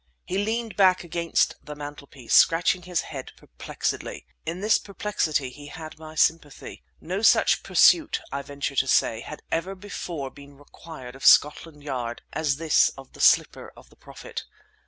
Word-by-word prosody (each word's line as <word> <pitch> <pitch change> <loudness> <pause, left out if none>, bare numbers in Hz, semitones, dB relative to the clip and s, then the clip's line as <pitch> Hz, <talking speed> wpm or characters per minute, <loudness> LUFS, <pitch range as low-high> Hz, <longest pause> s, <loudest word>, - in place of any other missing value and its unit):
He 190 - -2
leaned 225 +2 -2
back 185 -2 +4
against 170 -1 0
the 150 - -8
mantelpiece, 145 -3 -8
scratching 170 +2 +4
his 180 -1 -2
head 135 -4 -8
perplexedly. - - -5 0.2
In 170 - -3
this 215 +2 +3
perplexity 165 -9 -2
he 145 +2 -12
had 155 +1 -10
my 155 0 -11
sympathy. 155 -2 -1 0.2
No 185 +4 -4
such 225 - +4
pursuit, 325 -2 +4
I 140 - -3
venture 140 0 -5
to 135 - +2
say, 115 -3 +2
had 150 - -9
ever 180 +4 -2
before 175 -8 -6
been 140 0 -15
required 145 -3 -12
of 135 - -13
Scotland 150 0 +4
Yard 125 -4 -4
as 150 -3 0
this 160 +1 +3
of 135 -1 -13
the - - -9
slipper - - +3
of - - -17
the - - -20
Prophet. - - -9
155 Hz, 160 wpm, -25 LUFS, 140-180 Hz, 0.2 s, back